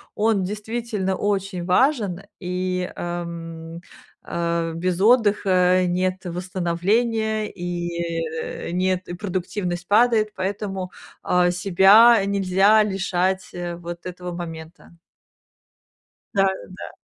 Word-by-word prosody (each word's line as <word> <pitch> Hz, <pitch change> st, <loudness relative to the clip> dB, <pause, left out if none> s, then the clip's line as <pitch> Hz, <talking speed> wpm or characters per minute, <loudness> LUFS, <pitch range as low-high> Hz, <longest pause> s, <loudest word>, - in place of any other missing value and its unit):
он 210 Hz, -2 st, +2 dB
действительно 210 Hz, -1 st, -3 dB
очень 195 Hz, -3 st, -2 dB
важен, 205 Hz, -, +2 dB, 0.2 s
и, 180 Hz, 0 st, -2 dB
ам, 170 Hz, -1 st, -6 dB, 0.5 s
а, 170 Hz, -1 st, -1 dB
без 175 Hz, +2 st, -2 dB
отдыха 195 Hz, -5 st, +4 dB
нет 185 Hz, +1 st, 0 dB
восстановления, 195 Hz, +5 st, -1 dB
и 170 Hz, -2 st, -4 dB
нет 185 Hz, 0 st, 0 dB
и -, -, -4 dB
продуктивность 180 Hz, -1 st, -4 dB
падает, 220 Hz, 0 st, +4 dB
поэтому, 190 Hz, -1 st, -3 dB, 0.3 s
а, 180 Hz, 0 st, +2 dB
себя 195 Hz, +6 st, +6 dB
нельзя 200 Hz, +2 st, +4 dB
лишать, 190 Hz, -1 st, -1 dB
э, 175 Hz, -1 st, -4 dB
вот 170 Hz, 0 st, -8 dB
этого 180 Hz, 0 st, -6 dB
момента. 170 Hz, 0 st, -9 dB, 1.4 s
Да-да. 190 Hz, -1 st, -2 dB
185 Hz, 90 wpm, -23 LUFS, 175-200 Hz, 1.4 s, себя